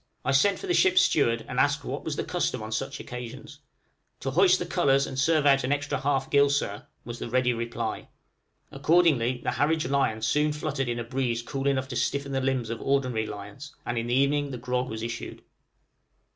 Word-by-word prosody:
I - - +2
sent 195 +9 +3
for - - -7
the 360 - 0
ship's 370 0 +5
steward 115 -6 +2
and - - -3
asked - - +2
what - - -4
was - - -3
the - - -2
custom - - -2
on 110 - -7
such 135 +5 -3
occasions? 130 +4 -8 0.6
"To 135 - -2
hoist 185 +5 +5
the 175 - -4
colors 140 -6 +2
and 130 - -5
serve 155 +2 +3
out 135 -2 +5
an 130 - -1
extra 145 -1 -1
half 135 -1 0
gill, 140 0 +5
sir," 140 -8 -2 0.2
was 120 +1 -7
the - - -5
ready 125 0 +2
reply: 115 0 -4 0.6
accordingly, 140 -5 +2
the - - 0
Harwich 150 +4 +1
lion 130 -5 0
soon 150 0 +2
fluttered 145 -4 -2
in 120 - -2
a 120 - -3
breeze 120 -1 -2
cool 135 +2 -3
enough 135 -1 +1
to - - -5
stiffen 140 0 -1
the 135 0 0
limbs 130 -4 -1
of 115 - -5
ordinary 130 -5 0
lions, 105 +8 -9
and 120 - -2
in 115 - -3
the 120 - +1
evening 140 +2 +2
the 130 - -5
grog 125 +1 -2
was 110 0 -5
issued. 115 0 -6
135 Hz, 210 wpm, -27 LUFS, 120-145 Hz, 0.6 s, ship's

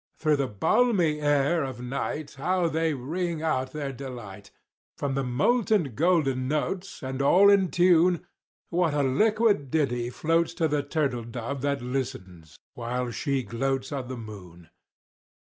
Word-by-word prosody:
Through 155 -2 +2
the 140 -1 0
balmy 170 - +2
air 145 +2 +2
of 130 -3 -5
night 140 +4 -4
How 175 +5 0
they 160 -1 0
ring 160 +5 -3
out 130 -5 0
their 145 -2 -4
delight!— 120 -7 -9 0.5
From 140 -1 -2
the 135 0 -1
molten 175 - +1
golden 140 -4 +1
notes, 180 +6 -3
And 130 +1 -3
all 190 +8 +6
in 195 -3 +4
tune, 175 -1 +3 0.5
What 170 -3 +1
a 145 - +2
liquid 210 - +2
ditty 125 -5 0
floats 165 +5 0
To 165 - +1
the 150 -1 0
turtle 140 -4 -1
dove 120 +3 -5
that 140 -2 -1
listens, 120 - -5 0.2
while 125 +1 -3
she 135 +1 -1
gloats 130 +3 -2
On 135 -3 -4
the 130 0 -6
moon! 90 -7 -11
140 Hz, 145 wpm, -26 LUFS, 125-165 Hz, 0.5 s, all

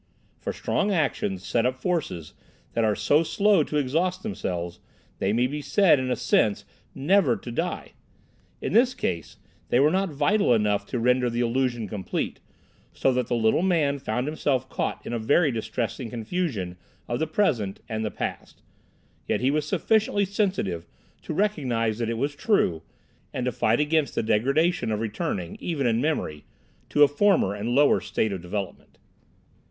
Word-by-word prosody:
For - - -3
strong 205 - -1
actions 120 - -1
set 115 - +1
up 125 +1 +1
forces 130 - -2 0.4
that 115 - +1
are 105 -2 +2
so 150 +8 +3
slow 200 +2 +3
to 150 - -2
exhaust 170 +7 0
themselves, 90 - -4 0.4
they 95 - +1
may 120 +3 +2
be 145 +3 -3
said 160 +1 +4
in 130 0 -2
a 125 - +1
sense 105 -2 +1 0.3
never 145 -2 +3
to 115 +4 -8
die. 170 +9 -3 0.7
In - - -2
this 250 +3 +4
case 85 - -3 0.3
they 120 - +3
were 145 +3 +5
not 190 +1 +1
vital 150 - +2
enough 105 -2 +1
to 125 - -3
render 125 +1 +2
the 120 +1 -1
illusion 120 -2 0
complete, 95 -1 -3 0.5
so 135 - +1
that 125 -1 0
the 120 - 0
little 110 +5 +2
man 160 -7 +1
found 125 0 -2
himself 140 -4 -1
caught - - -3
in - - -4
a 120 - -1
very 145 +7 +3
distressing 115 +2 -3
confusion 115 - -3 0.3
of 120 0 -2
the 160 - 0
present 130 - 0
and 110 -1 -3
the 110 - -1
past; - - -6 0.6
yet - - +1
he 130 +2 +2
was 150 0 -1
sufficiently 205 +1 +2
sensitive 185 - -1 0.3
to - - -7
recognise 130 - 0
that 115 -1 -1
it 115 - -2
was 140 +4 -1
true, 145 - +1 0.5
and 125 - -3
to 125 - +1
fight 110 0 +1
against 150 0 +1
the - - 0
degradation 140 +8 +1
of 105 - -1
returning, 100 -5 -3
even 155 -6 -2
in 115 0 +2
memory, 125 - -2 0.5
to 145 - +5
a - - +8
former 145 - +2
and 105 +3 -4
lower 145 +1 +5
state 110 - -1
of 95 - -5
development. 95 +2 -6
125 Hz, 170 wpm, -25 LUFS, 110-160 Hz, 0.7 s, a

